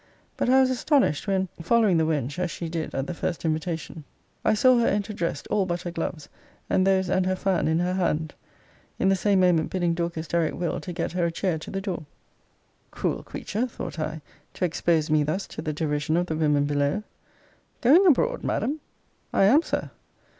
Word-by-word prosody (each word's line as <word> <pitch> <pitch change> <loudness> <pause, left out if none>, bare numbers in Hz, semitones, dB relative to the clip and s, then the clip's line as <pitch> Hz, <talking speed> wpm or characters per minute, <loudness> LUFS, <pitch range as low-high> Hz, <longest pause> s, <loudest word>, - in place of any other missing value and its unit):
But - - 0
I 260 +1 +6
was 260 -1 +4
astonished, 255 - +1
when 190 -1 +1
(following 205 0 +3
the 160 -1 +2
wench, 150 -1 -1
as 180 -1 0
she 170 -1 -5
did 160 -1 -4
at 135 - -1
the 175 - -4
first 170 0 -3
invitation) 160 0 -3 0.4
I - - +3
saw 255 +3 +5
her 235 - +2
enter 205 +1 0
dressed, 170 -4 -3
all 195 -3 +2
but 175 0 -2
her 175 - -4
gloves, 165 -2 -4 0.4
and 185 0 +3
those 190 -1 +3
and 185 +1 +2
her 185 - +1
fan 185 -3 0
in 160 +1 +2
her 180 +1 0
hand; 160 -4 -1 0.6
in 190 - +2
the 195 - +4
same 195 0 +2
moment 175 -3 +3
bidding 175 -2 0
Dorcas 170 -1 -3
direct 170 -2 0
Will. 175 -2 -2
to 180 - -7
get 170 -1 -3
her 175 0 0
a - - -2
chair 170 -1 -1
to - - -9
the 195 - -3
door. 185 -6 -4 0.8
Cruel - - -2
creature, 230 +5 -3
thought 230 - -7
I, 155 0 -3 0.3
to 185 - 0
expose 165 -2 +1
me 155 -1 +4
thus 155 +7 -1
to - - -8
the 155 - -2
derision 150 0 -1
of 175 - +1
the 160 - -3
women 150 -2 +2
below! 145 +7 0 0.8
Going 300 +11 +6
abroad, 475 - +3
Madam! 300 +4 -1 0.5
I - - +3
am, 255 +11 +6
Sir. - - -3
175 Hz, 205 wpm, -25 LUFS, 160-195 Hz, 0.8 s, I